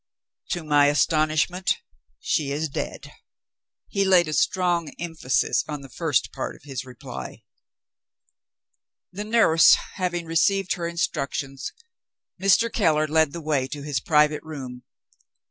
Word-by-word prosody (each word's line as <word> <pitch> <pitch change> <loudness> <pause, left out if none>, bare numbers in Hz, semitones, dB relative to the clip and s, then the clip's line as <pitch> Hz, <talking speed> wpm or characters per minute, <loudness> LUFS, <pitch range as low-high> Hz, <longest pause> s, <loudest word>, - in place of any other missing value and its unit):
"To 175 - -2
my 145 -2 +4
astonishment, 155 +4 +1 0.4
she 145 - -1
is 155 +2 -2
dead." - - -5 0.8
He 200 - 0
laid 185 -3 +4
a 155 - -3
strong 175 -2 +1
emphasis 165 -6 0
on 150 -2 -5
the 135 -2 -12
first 160 -3 0
part 135 - -5
of - - -19
his 135 -3 -5
reply. 125 -2 -9 1.7
The 205 +3 -6
nurse 215 -8 +6 0.2
having 175 -2 -2
received 185 +4 +2
her 170 -1 -3
instructions, 140 -5 -3 0.7
Mr. 195 +4 +3
Keller 155 -7 +2
led 160 -1 +2
the 170 - -7
way 145 -4 0
to 145 +1 -7
his 145 -2 -1
private 150 -1 +2
room. 130 -6 -8
155 Hz, 130 wpm, -24 LUFS, 145-175 Hz, 1.7 s, nurse